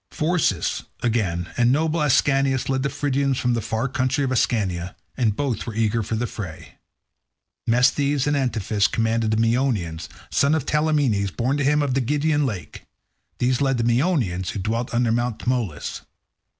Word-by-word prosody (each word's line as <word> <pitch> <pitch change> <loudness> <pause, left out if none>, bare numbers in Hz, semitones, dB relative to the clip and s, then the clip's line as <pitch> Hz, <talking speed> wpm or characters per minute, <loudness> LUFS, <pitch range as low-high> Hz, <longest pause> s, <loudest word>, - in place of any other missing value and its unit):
Phorcys, 155 - 0 0.2
again, 95 -8 0
and 120 0 +4
noble 160 +3 +1
Ascanius 135 -2 +2
led 135 -1 +1
the 140 - 0
Phrygians 140 -2 0
from 125 -2 +1
the 115 - 0
far 110 +5 -2
country 130 +2 0
of 130 - -1
Ascania, 95 -8 0 0.2
and 115 -6 +1
both 130 -5 -2
were 110 - -5
eager 115 0 +1
for 110 +2 -3
the 115 +2 -1
fray. 85 -9 -8 0.9
Mesthles 135 +3 +2
and 145 0 +1
Antiphus 110 -6 +1
commanded 115 0 0
the 110 - +1
Meonians, 115 -8 0 0.2
sons 140 +3 +3
of 150 -4 -2
Talaemenes, 145 -11 +1
born 125 +8 -1
to 145 - 0
him 150 +2 +3
of 140 -3 -1
the 135 - +1
Gygaean 150 +3 +1
lake. 90 - -7 0.5
These 125 +1 +1
led 135 -2 +2
the 115 - 0
Meonians, 120 - +1
who - - -4
dwelt 115 +5 -2
under 120 -1 +1
Mt. 120 0 0
Tmolus. 120 - -2
125 Hz, 165 wpm, -23 LUFS, 110-140 Hz, 0.9 s, and